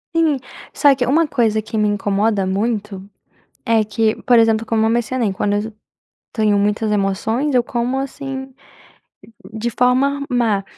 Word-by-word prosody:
Sim. 320 -4 +2 0.4
Só 285 -1 +4
que 250 -2 -1
uma 315 +5 +2
coisa 220 -5 +1
que 220 +1 -6
me 210 -1 +2
incomoda 205 0 0
muito 200 0 -3 0.6
é 225 -1 +2
que, 215 +1 0
por 245 -1 +4
exemplo, 225 0 +2
como 220 -1 +1
eu - - +2
mencionei, 235 -2 0
quando 205 +2 -1
eu 210 +2 -2 0.6
tenho 215 -3 +2
muitas 210 +2 0
emoções, 220 +8 -1
eu 245 - +4
como 245 +2 -2
assim 270 -1 -6 1.0
de 220 +2 -2
forma 260 +4 +1
má, 230 -6 +1
225 Hz, 150 wpm, -19 LUFS, 210-255 Hz, 1.0 s, Só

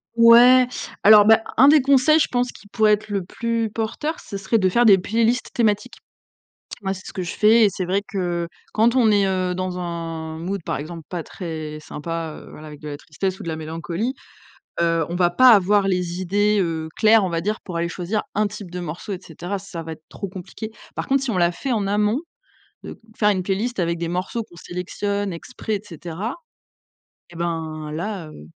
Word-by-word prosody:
Ouais. 240 +2 +7 0.3
Alors, 210 0 +8
bah, 220 +1 +6 0.2
un 270 +4 +7
des 300 -1 +7
conseils, 280 +3 +4
je - - +3
pense, 245 0 -1
qui 205 - -16
pourrait 215 0 +3
être 210 0 -2
le 200 -2 -1
plus 230 +1 -2
porteur, 230 +9 -3
ce 200 - -7
serait 205 +3 +1
de 190 - +3
faire 235 +6 +3
des 200 -3 +8
playlists 230 +5 0
thématiques. 210 -3 0 0.9
Moi 190 -1 -1
c'est 185 -1 -9
ce - - -8
que 185 - -3
je 175 - -5
fais, 220 +2 +5
et - - +6
c'est 185 0 -4
vrai 195 +3 0
que 175 -3 -2 0.3
quand 230 +3 +3
on 230 -4 +5
est, 200 -1 +3
heu, 185 -1 0
dans 185 0 -3
un 165 -2 -5
mood 190 +3 -3
par - - -3
exemple 160 +4 -7
pas 175 -2 -4
très 155 -3 -6
sympa, 165 +1 -5
heu, - - -13
voilà, 155 - -11
avec 150 -1 -11
de 150 - -7
la 145 - -5
tristesse 185 +6 -4
ou - - -6
de - - -5
la 160 - -2
mélancolie, 165 +8 -3 0.7
heu, 165 -1 +2
on 170 - -4
va 175 -1 +3
pas 255 +8 +6
avoir 200 -1 +4
les 180 -1 -1
idées, 205 +3 +2
heu, 160 -3 -2
claires, 220 -1 +5
on 185 - -2
va 165 - -1
dire. 210 +5 -2
Pour 180 -3 -6
aller 170 0 -1
choisir 185 +4 -2
un 210 +1 +2
type 205 -3 -8
de 180 0 -5
morceaux 175 +4 -6
et - - -6
cetera, 175 +5 -5
ça 185 -3 -8
va 165 0 -7
être 155 0 -11
trop 200 - -6
compliqué. 190 +4 -8 0.2
Par - - -4
contre 270 0 +2
si 260 - -2
on 185 - -1
l'a 175 0 +3
fait 265 +7 -3
en 205 -3 0
amont, 210 +5 +1 0.6
heu, - - -9 0.2
faire 210 -1 +3
une 185 -2 0
playlist 200 +4 -2
avec 170 0 0
des 170 0 -3
morceaux 185 +6 -2
qu'on 175 - -19
sélectionne 200 +3 -3
exprès 215 +5 -4
et 200 - -8
cetera 175 - -6 0.9
et 170 - -13
ben 160 -2 -3
là, 175 +1 -4
heu, 75 - -12
190 Hz, 215 wpm, -22 LUFS, 170-215 Hz, 0.9 s, Alors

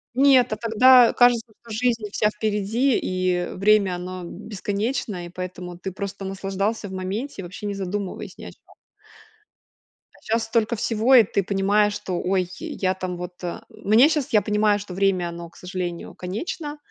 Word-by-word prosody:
Нет, 265 -2 +5
а - - 0
тогда 240 +2 +6
кажется, 240 -2 +3
что 235 - -17
жизнь 230 0 0
вся 210 +1 +2
впереди 215 +4 0
и, 185 0 0
э, 180 0 -2
время 200 -1 +3
оно 180 +1 -6
бесконечное 205 0 -4
и - - -11
поэтому 180 0 -7
ты 190 +2 -5
просто 195 +1 -6
наслаждался 195 +3 -2
в - - -9
моменте 195 +7 -4
и - - -8
вообще 185 +4 -8
не 205 - -2
задумываясь 195 0 -5
ни - - -10
о - - -8
чё - - -21 1.6
а - - -21
щас 225 +1 0
столько 225 +1 +1
всего 230 +3 +2
и 240 - +9
ты 200 -1 -1
понимаешь, 200 +2 +2
что 185 -3 -3
ой, 185 -1 0
я 185 -1 -1
там, 185 -1 -5
вот, 180 +1 -8
а. 175 - -5
Мне 225 +8 +4
щас, 300 -5 -1
я 210 - +6
понимаю, 210 -1 +2
что 200 -2 -8
время, 185 -2 +1
оно, 170 0 -8
к - - -20
сожалению, 180 -2 -5
конечно 290 - -5
200 Hz, 175 wpm, -23 LUFS, 185-225 Hz, 1.6 s, и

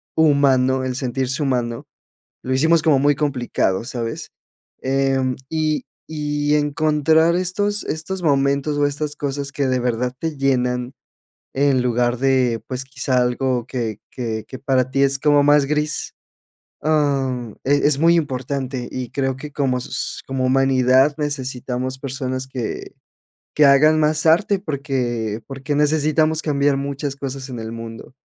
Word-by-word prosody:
humano, 135 -4 +3
el 130 -1 -2
sentirse 130 +2 -2
humano, 120 -4 -1 0.6
lo 130 - -1
hicimos 160 +5 +4
como 155 -4 +4
muy 145 +1 +3
complicado, 125 -9 -1
¿sabes? 120 -2 -5 0.5
Em, 135 -1 +1
y 155 -1 -1 0.2
y 150 -1 -1
encontrar 155 +2 +2
estos 205 +3 0
estos 175 +4 -4
momentos 140 0 +1
o 145 - +3
estas 145 +1 -3
cosas 140 -1 -3
que 140 -1 -1
de 130 -1 +1
verdad 125 +1 -1
te 160 -3 -3
llenan, 125 -2 0 0.6
en 135 -1 +2
lugar 120 0 +1
de, 130 -3 +2
pues, 130 0 -4
quizá 130 -1 0
algo 125 0 0
que 115 -5 -3
que 110 -3 -4
que 130 - -8
para 130 -2 +1
ti 135 +1 +2
es 135 0 +1
como 145 0 +4
más 145 0 +5
gris, 150 +1 -2 0.7
am, 135 -6 0
eh, 145 +1 +3
es 145 -1 +3
muy 165 +2 +5
importante 130 -4 -2
y 125 -2 -4
creo 135 -2 -1
que 150 +2 -8
como 135 -3 0
sos - - -5
como 130 -1 -1
humanidad, 130 +1 +4
necesitamos 130 -3 -3
personas 130 -1 -4
que 125 -4 -5 0.6
que 150 - +5
hagan 155 +3 +5
más 155 +1 +1
arte, 195 +5 +4
porque 125 - -3
porque 135 +1 -4
necesitamos 155 +1 +2
cambiar 145 -2 +1
muchas 140 0 -4
cosas 135 -1 -5
en 125 - -6
el 110 0 -6
mundo 115 +1 -9
135 Hz, 145 wpm, -21 LUFS, 130-150 Hz, 0.7 s, más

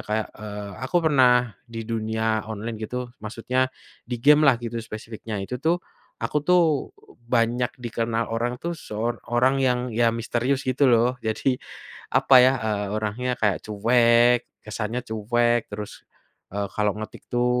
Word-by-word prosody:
kayak, 110 +1 -1
eee, 105 -1 -7
aku 175 - -1
pernah 125 -5 +4
di 115 -1 -6
dunia 110 -1 -1
online 110 +1 -5
gitu 125 +2 -4
maksudnya, 125 +4 -1 0.4
di 120 -1 -4
gamelah 150 -2 +6
gitu 115 0 -4
spesifiknya 110 -2 -6
itu 125 +5 -5
tuh, 170 +5 +1 0.4
aku 150 - 0
tuh, 180 -1 +5 0.7
banyak 120 +1 +2
dikenal 115 -1 -2
orang 120 +2 -1
tuh 170 0 -3
sor 115 -4 -4
orang 130 +3 +3
yang 125 -1 +1
iya 115 0 +3
misterius 120 +4 -1
gitu 130 +3 +2
loh 120 +2 +3
jadi, 125 +4 0 0.6
apa 130 - +5
ya, 130 - +5
eee, 105 -2 -1
orangnya 110 +4 -2
kayak 105 -4 +2
cuek 120 +3 +4 0.2
kesannya 110 +2 -3
cuek 120 +2 +1
terus, 105 0 -7 0.5
eee, 100 -1 -2
kalau 105 -1 +1
ngetik 110 - -8
itu, 120 0 +1
115 Hz, 145 wpm, -24 LUFS, 110-125 Hz, 0.7 s, gamelah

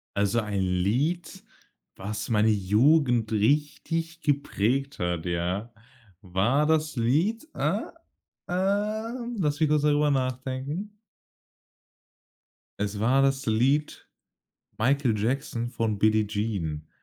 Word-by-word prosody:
Also 100 +3 +2
ein 105 -2 -3
Lied, 125 - -1 0.5
was 105 +3 -5
meine 110 -1 +3
Jugend 115 +4 +3
richtig 150 +8 0
geprägt 135 -1 0
hat, 90 -2 -2
ja, 90 +6 -2 0.5
war 105 +10 +1
das 155 -3 +1
Lied, 170 - +1
äh, - - 0 0.7
ähm, 215 +6 -1
lass 150 -4 0
mich 155 - +4
kurz 150 -1 +2
darüber 150 0 +3
nachdenken. 130 - -3 1.8
Es 105 0 -2
war 125 +5 +3
das 135 0 +1
Lied 130 +7 +1 0.7
„Michael 125 -1 +2
Jackson“ 120 +1 -1
von 115 -3 -2
„Billie 110 +1 +3
Jean“. 100 -8 -3
130 Hz, 100 wpm, -26 LUFS, 105-150 Hz, 1.8 s, mich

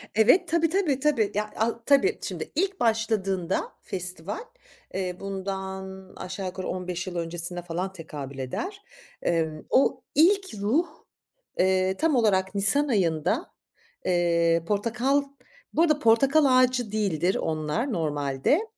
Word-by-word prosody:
Evet, 250 - +5
tabii, 330 0 +2
tabii, 325 -7 +1
tabii. 265 -8 +2
Ya 210 +1 -1
a 230 +1 -1
tabii, 285 +10 +4
şimdi - - -5
ilk 385 +4 0
başladığında 210 -6 0
festival, 180 - -4 0.5
eee, 180 -2 -3
bundan 190 -1 -6
aşağı 185 +1 -6
yukarı 185 0 -5
15 180 0 -4
yıl 180 - -5
öncesine 170 +1 -2
falan 175 +2 -3
tekabül 145 -6 -8
eder. 365 - -5 0.4
Emm, 160 -2 -1
o 265 - +3
ilk 380 - +4
ruh, 275 +13 +2 0.7
eee, 190 0 +2
tam 320 -3 +2
olarak 200 -5 +2
nisan 250 +9 +3
ayında, 170 - 0 0.5
eee, 170 -2 +2
portakal 240 +7 +1 0.5
bu 320 - +2
arada 305 -3 +3
portakal 275 +5 +4
ağacı 255 -3 +3
değildir 190 -4 0
onlar 155 - -1
normalde. 145 -5 -1
Eee, 330 +9 +4
195 Hz, 130 wpm, -26 LUFS, 175-265 Hz, 0.7 s, Evet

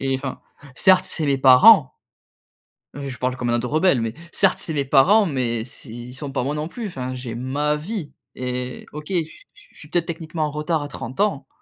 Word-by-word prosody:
et 135 0 0
enfin, 130 0 -4 0.3
certes, 185 +3 +5
c'est 160 - -3
mes 140 -1 +2
parents 130 - +7 1.1
je 140 -3 -6
parle 125 0 -1
comme 125 -2 -3
un - - +2
ado 120 +1 -1
rebelle, 155 -4 +3
mais, 115 -1 -2 0.2
certes, 195 -2 +2
c'est - - -4
mes 140 -1 0
parents, 180 +11 +5
mais 125 - -1
s 120 +4 -10
ils 120 +1 -9
sont 135 +1 -6
pas 130 - -1
moi 140 - -1
non 150 +1 -3
plus. 230 +6 -7
Enfin, 130 -9 -5
j'ai 125 -2 -6
ma 140 +5 -1
vie 165 +1 -5 0.2
et 125 0 -4
OK 150 0 -8
je 195 - -1
s 160 - -9 0.4
je - - -23
suis 150 - -11
peut-être, 170 0 0
techniquement 160 -1 -4
en 150 - -3
retard, 150 +1 -1
à 145 - -5
30 130 -3 -8
ans, 210 0 0
140 Hz, 215 wpm, -22 LUFS, 125-160 Hz, 1.1 s, parents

